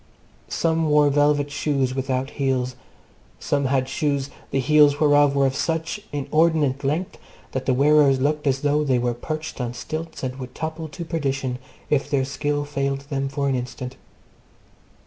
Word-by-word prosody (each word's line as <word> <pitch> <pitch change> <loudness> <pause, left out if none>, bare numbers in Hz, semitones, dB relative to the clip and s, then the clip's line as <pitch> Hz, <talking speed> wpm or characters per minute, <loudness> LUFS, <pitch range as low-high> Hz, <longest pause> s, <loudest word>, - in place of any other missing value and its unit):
Some 160 -1 +1
wore 150 -1 +5
velvet 145 0 +2
shoes 140 -3 0
without 130 0 -2
heels. 130 -2 -1 0.6
Some 140 -1 0
had 130 -1 +1
shoes, 140 0 -1 0.2
the 135 - 0
heels 145 +1 +5
whereof 145 -2 +4
were 140 -1 +3
of 135 0 0
such 165 +5 -1
inordinate 145 -1 +1
length 155 +7 -2 0.3
that 130 - -4
the 130 - +4
wearers 140 -1 +5
looked 150 +2 0
as 135 0 +1
though 145 +1 +2
they 130 -4 +2
were 120 0 0
perched 155 +4 -5
on 120 0 -3
stilts 160 +6 -6
and 130 0 -3
would 130 -2 -8
topple 160 0 -4
to 170 +2 -7
perdition 135 -6 -2 0.3
if 145 -1 +1
their 140 -2 +1
skill 145 +1 -2
failed 140 -1 -2 0.2
for 140 0 -1
an 135 - +1
instant. 125 0 -4
140 Hz, 160 wpm, -23 LUFS, 135-150 Hz, 0.6 s, wore